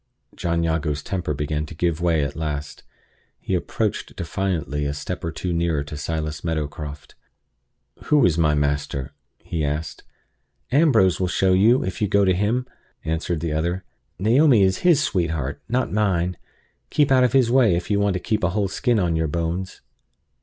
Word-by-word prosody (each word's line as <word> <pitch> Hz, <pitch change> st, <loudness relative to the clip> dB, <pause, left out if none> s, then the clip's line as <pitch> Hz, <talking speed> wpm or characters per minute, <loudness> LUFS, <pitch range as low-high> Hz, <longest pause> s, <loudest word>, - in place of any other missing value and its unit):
John 85 Hz, -1 st, -1 dB
Jago's 80 Hz, -3 st, -1 dB
temper 90 Hz, -5 st, -3 dB
began 75 Hz, +1 st, -2 dB
to 80 Hz, -, -10 dB
give 85 Hz, 0 st, -1 dB
way 85 Hz, -3 st, +2 dB
at 70 Hz, 0 st, -4 dB
last. 75 Hz, -2 st, -4 dB, 0.6 s
He -, -, -4 dB
approached -, -, -2 dB
defiantly 85 Hz, -5 st, -2 dB
a 70 Hz, -, -3 dB
step 90 Hz, +4 st, -5 dB
or 85 Hz, -, -2 dB
two 85 Hz, +2 st, -3 dB
nearer 85 Hz, -3 st, 0 dB
to 75 Hz, +1 st, -8 dB
Silas 75 Hz, +1 st, -4 dB
Meadowcroft. 75 Hz, -2 st, -4 dB, 0.9 s
"Who 150 Hz, -3 st, +4 dB
is 85 Hz, -4 st, +3 dB
my 75 Hz, -2 st, +2 dB
master?" 70 Hz, -1 st, -1 dB, 0.3 s
he 80 Hz, -2 st, -3 dB
asked. 75 Hz, 0 st, -3 dB, 0.7 s
"Ambrose 125 Hz, -, +4 dB
will 90 Hz, -, +1 dB
show 95 Hz, +1 st, +2 dB
you, 110 Hz, +7 st, +4 dB
if 95 Hz, +2 st, -5 dB
you 105 Hz, -, +2 dB
go 100 Hz, +1 st, +3 dB
to 95 Hz, -, +3 dB
him," 105 Hz, +7 st, 0 dB, 0.4 s
answered 80 Hz, 0 st, -2 dB
the 80 Hz, -2 st, -2 dB
other. 85 Hz, +4 st, -1 dB, 0.3 s
"Naomi 115 Hz, -, +4 dB
is 95 Hz, -1 st, +2 dB
his 165 Hz, -5 st, +4 dB
sweetheart, 80 Hz, -, -1 dB
not 125 Hz, -1 st, 0 dB
mine. 90 Hz, -4 st, +1 dB, 0.5 s
Keep 145 Hz, -2 st, +2 dB
out 130 Hz, -1 st, +5 dB
of 125 Hz, -, +2 dB
his 130 Hz, -3 st, +4 dB
way, 120 Hz, -8 st, +4 dB
if 90 Hz, +4 st, -3 dB
you 100 Hz, -, +2 dB
want 100 Hz, -2 st, +1 dB
to -, -, -1 dB
keep 110 Hz, +3 st, -1 dB
a 90 Hz, -, +3 dB
whole 100 Hz, +1 st, 0 dB
skin 120 Hz, +4 st, +1 dB
on 85 Hz, -3 st, +1 dB
your 80 Hz, 0 st, 0 dB
bones." 85 Hz, +4 st, -3 dB
85 Hz, 175 wpm, -23 LUFS, 75-100 Hz, 0.9 s, out